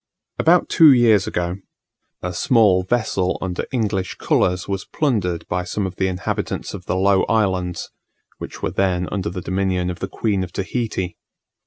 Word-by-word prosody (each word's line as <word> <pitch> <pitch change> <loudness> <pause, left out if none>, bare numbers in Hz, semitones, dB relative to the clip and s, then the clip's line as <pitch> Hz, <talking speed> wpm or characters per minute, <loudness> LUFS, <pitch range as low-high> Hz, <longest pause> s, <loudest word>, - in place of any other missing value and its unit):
About 175 +2 +4
two 160 -4 +7
years 115 -6 +4
ago, 90 +1 -2 0.7
a 90 0 -3
small 105 -2 +4
vessel 95 -3 0
under 90 -1 -3
English 105 -6 -1
colours 90 +1 +1
was 95 -1 -2
plundered 100 - -1
by 90 - -1
some 100 +2 -2
of 95 -1 -6
the 95 - +1
inhabitants 90 -1 -3
of 95 -3 -9
the - - 0
Low 95 +1 +3
Islands, 95 -5 0 0.5
which - - -8
were - - 0
then 90 -2 0
under 95 -4 -2
the 90 +1 -5
dominion 95 0 -1
of 90 - -8
the - - -3
Queen 100 -4 -1
of 90 - -7
Tahiti. 100 -3 -3
95 Hz, 165 wpm, -21 LUFS, 90-105 Hz, 0.7 s, two